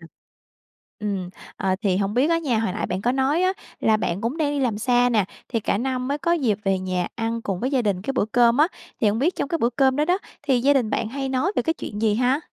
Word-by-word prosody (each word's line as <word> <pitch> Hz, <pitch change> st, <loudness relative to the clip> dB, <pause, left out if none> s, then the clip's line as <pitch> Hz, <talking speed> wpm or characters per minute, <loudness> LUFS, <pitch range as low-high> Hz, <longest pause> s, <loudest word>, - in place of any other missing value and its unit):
Ừm. 165 Hz, -, -13 dB, 0.9 s
Ừm. 195 Hz, -4 st, -3 dB, 0.3 s
À, 190 Hz, -3 st, 0 dB
thì 190 Hz, -3 st, +2 dB
hông 200 Hz, +1 st, -1 dB
biết 265 Hz, +6 st, +3 dB
á 335 Hz, -, +3 dB
nha, 265 Hz, -9 st, 0 dB
hồi 220 Hz, -5 st, -1 dB
nãy -, -, -2 dB
bạn 185 Hz, +1 st, -3 dB
có 245 Hz, +3 st, +2 dB
nói 270 Hz, +6 st, +1 dB
á 370 Hz, +1 st, +3 dB, 0.3 s
là 220 Hz, -1 st, +3 dB
bạn 190 Hz, -3 st, -2 dB
cũng 235 Hz, +7 st, -2 dB
đang 305 Hz, -3 st, 0 dB
đi 290 Hz, -, -1 dB
làm 230 Hz, -5 st, 0 dB
xa 245 Hz, +2 st, +3 dB
nè, 215 Hz, -5 st, +2 dB, 0.2 s
thì 230 Hz, -2 st, -1 dB
cả 200 Hz, -, 0 dB
năm 255 Hz, +1 st, -2 dB
mới 285 Hz, -, -1 dB
có 335 Hz, +4 st, +1 dB
dịp 240 Hz, -, +1 dB
về 195 Hz, -1 st, +2 dB
nhà 185 Hz, -1 st, -2 dB
ăn 230 Hz, 0 st, -2 dB
cùng 190 Hz, -4 st, -3 dB
với 255 Hz, -, -1 dB
gia 260 Hz, -3 st, +2 dB
đình 195 Hz, -4 st, -1 dB
cái 270 Hz, -, -2 dB
bữa 255 Hz, -, +1 dB
cơm 240 Hz, 0 st, +5 dB
á, 310 Hz, -, +5 dB, 0.3 s
thì 215 Hz, -, +4 dB
hông 210 Hz, -, 0 dB
biết 320 Hz, +9 st, +1 dB
trong 280 Hz, -, -2 dB
cái 335 Hz, -, -1 dB
bữa 235 Hz, -1 st, +2 dB
cơm 265 Hz, +1 st, +2 dB
đó 300 Hz, -, +2 dB
đó, 360 Hz, +4 st, +2 dB, 0.2 s
thì 260 Hz, -4 st, +2 dB
gia 280 Hz, +3 st, +4 dB
đình 245 Hz, -6 st, +1 dB
bạn 220 Hz, -, -1 dB
hay 270 Hz, +2 st, -3 dB
nói 265 Hz, +9 st, 0 dB
về -, -, +2 dB
cái 325 Hz, 0 st, 0 dB
chuyện 210 Hz, -8 st, -6 dB
gì 215 Hz, -2 st, +3 dB
ha? 250 Hz, +5 st, +2 dB
245 Hz, 280 wpm, -23 LUFS, 210-275 Hz, 0.9 s, cơm